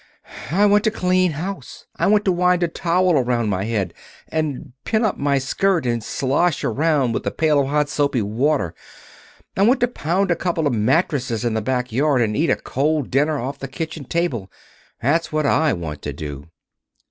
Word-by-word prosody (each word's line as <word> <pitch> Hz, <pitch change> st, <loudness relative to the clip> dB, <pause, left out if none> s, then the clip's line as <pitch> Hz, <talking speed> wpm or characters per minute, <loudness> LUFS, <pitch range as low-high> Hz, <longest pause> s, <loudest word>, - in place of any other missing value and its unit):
I 195 Hz, +7 st, +3 dB
want 205 Hz, 0 st, +4 dB
to -, -, +5 dB
clean 185 Hz, -4 st, +1 dB
house. 170 Hz, -1 st, -6 dB
I -, -, +1 dB
want 210 Hz, +1 st, +3 dB
to 190 Hz, -, +3 dB
wind 180 Hz, 0 st, +2 dB
a -, -, +3 dB
towel 180 Hz, +2 st, +1 dB
around 120 Hz, -3 st, 0 dB
my 95 Hz, 0 st, -1 dB
head, 105 Hz, -6 st, -2 dB, 0.3 s
and 155 Hz, -3 st, -3 dB
pin 220 Hz, 0 st, +1 dB
up 215 Hz, -, -1 dB
my 140 Hz, 0 st, +2 dB
skirt, 165 Hz, +5 st, 0 dB
and 120 Hz, -2 st, -1 dB
slosh 140 Hz, +7 st, 0 dB
around 140 Hz, -1 st, +1 dB
with -, -, -2 dB
a -, -, +3 dB
pail 155 Hz, -2 st, +2 dB
of 135 Hz, -, +1 dB
hot, 150 Hz, +1 st, +1 dB
soapy 140 Hz, -5 st, 0 dB
water. 115 Hz, -, 0 dB, 0.8 s
I -, -, 0 dB
want 245 Hz, +6 st, +4 dB
to 245 Hz, -, +4 dB
pound 190 Hz, -3 st, -1 dB
a -, -, +3 dB
couple 170 Hz, -3 st, -1 dB
of 140 Hz, -, +1 dB
mattresses 125 Hz, -, 0 dB
in 120 Hz, -, 0 dB
the 110 Hz, -, 0 dB
back 125 Hz, +1 st, -2 dB
yard, 135 Hz, +1 st, +2 dB
and 105 Hz, -1 st, -1 dB
eat 155 Hz, +3 st, +1 dB
a -, -, +4 dB
cold 150 Hz, +1 st, -1 dB
dinner 150 Hz, +3 st, +2 dB
off 135 Hz, +2 st, -4 dB
the 135 Hz, -, -5 dB
kitchen 160 Hz, +2 st, -6 dB
table. 125 Hz, -, -2 dB, 0.5 s
That's 160 Hz, +7 st, +1 dB
what 155 Hz, -1 st, 0 dB
I 150 Hz, +2 st, +3 dB
want 80 Hz, -6 st, -5 dB
to 75 Hz, -, -4 dB
do." 70 Hz, 0 st, -7 dB
145 Hz, 195 wpm, -21 LUFS, 120-175 Hz, 0.8 s, to